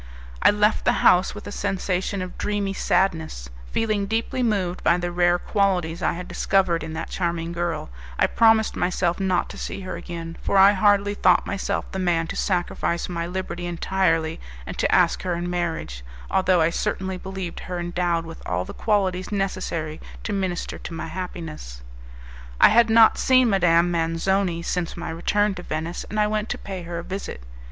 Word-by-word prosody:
I - - +7
left 210 +1 +2
the - - +3
house 180 +3 +5
with 210 - -9
a - - -6
sensation 195 -1 -2
of 185 - -8
dreamy 205 -1 -1
sadness; 160 - 0 0.2
feeling 215 -3 0
deeply 225 +4 -1
moved 195 -6 0
by 175 - +4
the 175 0 -3
rare 175 0 +3
qualities 180 -3 0
I 160 - +1
had 180 +1 -7
discovered 185 -4 +1
in 160 0 -6
that 160 - -5
charming 170 -2 -2
girl, 170 - -3 0.3
I - - +4
promised 225 -1 +3
myself 180 0 0
not 185 -2 +1
to - - -9
see - - -5
her 185 - -5
again, 165 -1 -7
for 200 - +1
I 195 +1 +8
hardly 205 0 +3
thought - - +3
myself 195 - -2
the 190 - -4
man 175 -3 +1
to - - -4
sacrifice 175 -2 -1
my 170 -1 -3
liberty 175 -1 -4
entirely 165 -2 0 0.3
and - - -6
to - - +2
ask - - +3
her 180 -2 -1
in 175 +1 -3
marriage, 170 - -3 0.3
although 185 -2 +3
I 160 +1 +3
certainly 190 0 -2
believed 190 -2 -6
her 180 -1 -5
endowed 175 -1 -1
with 165 0 -10
all 90 +1 -2
the - - -8
qualities 190 -4 0
necessary 185 -6 -2 0.2
to 210 - -3
minister 190 -3 -2
to - - -8
my 165 - -5
happiness. 160 - -7 0.8
I - - +8
had 230 +1 +5
not 225 0 +6
seen 255 -3 +4
Madame 175 -2 +3
Manzoni 170 +2 0
since 175 -1 -2
my 170 -1 -4
return 205 +5 +1
to 180 - -7
Venice, 160 +1 -4
and 215 - -2
I 210 - +4
went 215 0 -1
to - - -2
pay 190 -2 -6
her 170 0 -6
a 170 - -4
visit. 190 - -6
180 Hz, 185 wpm, -24 LUFS, 170-195 Hz, 0.8 s, I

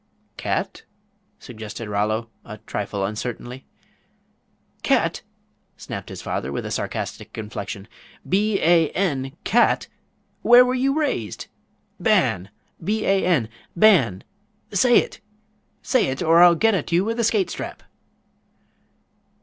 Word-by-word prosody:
"Cat?" - - -3 0.6
suggested 110 -1 -8
Rollo, 110 +2 -1
a 105 - -9
trifle 100 -1 -3
uncertainly. 120 +4 -6 1.2
"Cat?" - - +1 0.6
snapped - - -7
his - - -8
father, 65 - -3
with - - -4
a - - -5
sarcastic - - -5
inflection, 105 -2 -6 0.4
"b 200 +2 +1
a 165 -1 +4
n, 140 -7 -1
cat! 240 - +2 0.5
Where 245 +1 +7
were 250 - 0
you 270 +3 +1
raised? 120 - -2 0.5
Ban! 90 +3 +2 0.3
B 215 +5 -1
a 195 0 +2
n 160 -11 +2 0.3
Ban! 165 - +4 0.5
Say 240 +5 +5
it! - - 0 0.6
Say 255 - +2
it, 130 +5 -3
or 165 +1 +5
I'll 175 -1 +8
get 225 +6 +3
at 180 -3 -2
you 175 +3 +3
with 230 +2 -2
a - - +2
skate 215 -3 +1
strap!" - - -7
165 Hz, 125 wpm, -22 LUFS, -, 1.2 s, I'll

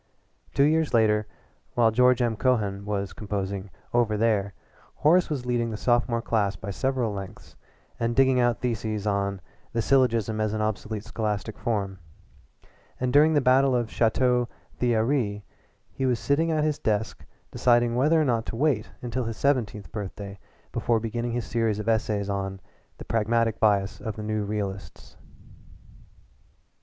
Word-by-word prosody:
Two 140 - +4
years 155 -2 +2
later 105 -2 +3 0.5
while 115 -2 +4
George 125 +2 +4
M. 115 -2 0
Cohan 105 -5 0
was 100 -1 -2
composing 100 -2 -4 0.2
"Over 115 -3 +2
There," 105 -3 +1 0.4
Horace 175 +4 +3
was 140 -5 -3
leading 120 -1 0
the 110 - -4
sophomore 120 0 +1
class 105 -4 0
by 100 - -6
several 130 -1 -1
lengths 95 -1 -9 0.4
and 115 0 0
digging 130 -1 +4
out 120 -1 +2
theses 110 -4 -2
on 100 -1 -1 0.3
"The 115 - +1
Syllogism 115 -4 +2
as 110 -1 0
an 110 - -1
Obsolete 105 0 -3
Scholastic 105 -1 -3
Form," 100 -5 -2 1.0
and 125 0 -1
during 155 +2 +5
the 145 - +4
battle 130 +1 +4
of 120 -2 0
Château 125 +1 +2 0.3
Thierry 115 -3 +1 0.5
he 135 - -2
was 125 -2 +2
sitting 150 +7 +1
at 155 -2 +1
his 150 -1 0
desk 110 0 -1 0.3
deciding 120 -1 +3
whether 150 +6 +3
or 155 - +2
not 115 -3 0
to - - -4
wait 125 -4 +1
until 125 +1 -2
his 115 -1 -4
seventeenth 115 -8 0
birthday 100 -1 -6 0.3
before 115 -1 +1
beginning 115 +1 -3
his 120 0 -2
series 115 -3 0
of 105 +1 -5
essays 110 -3 0
on 95 -1 -3 0.4
"The - - -9
Pragmatic 115 0 +1
Bias 100 -1 +2
of 110 - -4
the 110 - -6
New 105 -1 -1
Realists." 100 -2 -5
115 Hz, 155 wpm, -26 LUFS, 105-125 Hz, 1.0 s, during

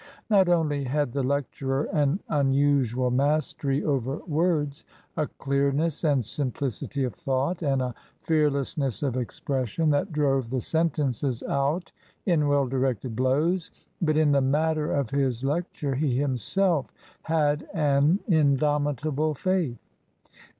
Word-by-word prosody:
Not 190 -3 +5
only 150 -5 +1
had 145 0 0
the 140 - 0
lecturer 135 0 -1
an 150 +3 +1
unusual 135 -4 +2
mastery 140 +1 0
over 135 -1 -1
words, 155 -3 0 0.3
a 155 -2 0
clearness 140 +4 -1
and 140 -7 +2
simplicity 135 +1 -3
of 125 - -2
thought 150 +2 -1
and 135 -4 +1
a 125 -1 -3 0.2
fearlessness 145 -4 0
of 135 -4 0
expression, 130 +4 -1
that 160 +7 0
drove 135 -5 +1
the 130 +1 -1
sentences 140 -5 -1
out 140 +6 -1 0.3
in 160 -6 +2
well 145 -1 +3
directed 130 -2 -1
blows, 150 +8 +1 0.3
but 155 -3 +2
in 155 -2 +4
the 140 -1 +3
matter 150 +3 +1
of 140 -6 -1
his 135 -3 0
lec 155 +6 0
ture 140 -2 -3
he 130 -2 0
himself 145 - +1 0.3
had 150 -2 0
an 150 +2 +2
indomitable 150 - +1
faith. 175 -7 0
145 Hz, 130 wpm, -26 LUFS, 135-155 Hz, 0.3 s, Not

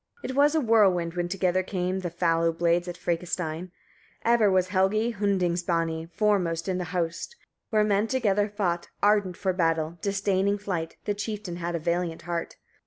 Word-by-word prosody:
52. - - -3
It - - -6
was 290 +2 +4
a 315 - +3
whirlwind, 195 -8 +3
when 175 0 -1
together 185 -1 +1
came 185 0 -2
the 180 -2 -3
fallow 165 -1 +1
blades 170 +1 +1
at 175 0 -5
Frekastein: 170 0 -3 0.6
ever 230 -3 +4
was 185 -1 +2
Helgi 210 +5 +2
Hundingsbani 170 -5 0
foremost 180 -5 0
in 185 -1 -1
the 180 - -2
host, 175 - -3 0.3
where 215 -2 +3
men 210 +1 +2
together 210 -5 +1
fought: 180 -5 -1 0.2
ardent 205 -3 +3
for 190 -2 0
battle, 165 -1 0
disdaining 200 0 +1
flight; 180 -5 -4
the 205 - 0
chieftain 205 -4 -5
had 170 0 -3
a - - -1
valiant 170 0 -2
heart. 170 -1 -4
185 Hz, 170 wpm, -26 LUFS, 170-205 Hz, 0.6 s, was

